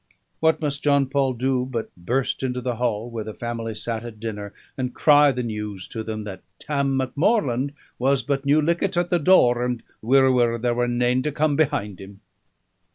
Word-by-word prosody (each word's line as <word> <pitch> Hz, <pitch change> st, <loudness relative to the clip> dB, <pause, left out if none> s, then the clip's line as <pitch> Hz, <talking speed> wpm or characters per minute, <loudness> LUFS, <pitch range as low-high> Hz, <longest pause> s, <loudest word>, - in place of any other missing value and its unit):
What 160 Hz, 0 st, +3 dB
must 145 Hz, -2 st, -2 dB
John 140 Hz, -1 st, +3 dB
Paul 135 Hz, -1 st, 0 dB
do 125 Hz, +1 st, 0 dB
but 125 Hz, -3 st, -5 dB
burst 125 Hz, +10 st, -1 dB
into 125 Hz, -1 st, -2 dB
the 125 Hz, -1 st, -3 dB
hall 120 Hz, -1 st, -1 dB
where 115 Hz, -2 st, -4 dB
the 110 Hz, 0 st, -8 dB
family 115 Hz, -2 st, -4 dB
sat 110 Hz, +1 st, -3 dB
at 115 Hz, -3 st, -9 dB
dinner, 105 Hz, -2 st, -5 dB, 0.2 s
and 125 Hz, -2 st, -3 dB
cry 145 Hz, -1 st, +6 dB
the 125 Hz, -1 st, -3 dB
news 105 Hz, -4 st, -5 dB
to 110 Hz, -, -5 dB
them 110 Hz, -1 st, -5 dB
that 95 Hz, -3 st, -8 dB, 0.2 s
"Tam 140 Hz, -2 st, -1 dB
Macmorland 140 Hz, -, 0 dB, 0.2 s
was 135 Hz, 0 st, +2 dB
but 135 Hz, +2 st, -1 dB
new 145 Hz, +2 st, +3 dB
lichtit 170 Hz, +3 st, 0 dB
at 175 Hz, 0 st, 0 dB
the 175 Hz, -, +3 dB
door, 125 Hz, -8 st, +4 dB
and 125 Hz, -2 st, -2 dB, 0.2 s
wirra, 130 Hz, +3 st, +4 dB
wirra 120 Hz, -2 st, +2 dB
there 120 Hz, +1 st, 0 dB
were 120 Hz, 0 st, 0 dB
nane 120 Hz, +1 st, +1 dB
to 150 Hz, -, -2 dB
come 150 Hz, 0 st, +1 dB
behind 105 Hz, -, -1 dB
him"? 95 Hz, +1 st, -12 dB
125 Hz, 195 wpm, -23 LUFS, 115-140 Hz, 0.2 s, cry